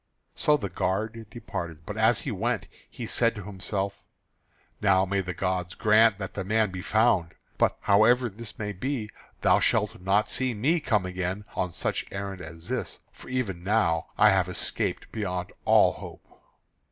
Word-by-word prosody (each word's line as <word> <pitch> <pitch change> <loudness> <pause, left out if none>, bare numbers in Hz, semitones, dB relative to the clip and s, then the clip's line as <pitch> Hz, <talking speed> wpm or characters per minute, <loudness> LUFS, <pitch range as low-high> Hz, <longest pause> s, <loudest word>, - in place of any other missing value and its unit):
So 150 0 +3
the 100 - -3
guard 110 +5 -2
departed; 85 -9 -6
but 105 - -5
as 110 +2 +3
he 135 - -3
went 110 +1 -1 0.2
he 120 - -7
said 115 +1 +1
to 105 - -7
himself: 100 0 -3 0.8
"Now 95 -2 +4
may 100 +1 0
the 90 -2 -5
gods 90 0 -2
grant 110 0 +5
that 95 -2 -6
the 100 - -3
man 105 +1 +1
be 90 0 -5
found; 100 -5 +2 0.2
but - - +3
however 120 +5 +4
this 110 0 -9
may 105 -1 -3
be, 110 +2 -3 0.3
thou - - +5
shalt - - +1
not 100 +3 +2
see 130 -2 -1
me 150 +11 +2
come 110 -10 +1
again 95 +2 -3
on 90 - 0
such - - -2
errand 95 -1 -5
as 80 0 -10
this, - - -3
for - - -13
even 105 -9 -2
now 90 -5 +1
have 95 -4 +5
I - - -5
escaped - - -2
beyond 90 -5 -3
all - - +6
hope." - - -11
100 Hz, 170 wpm, -27 LUFS, 90-110 Hz, 0.8 s, all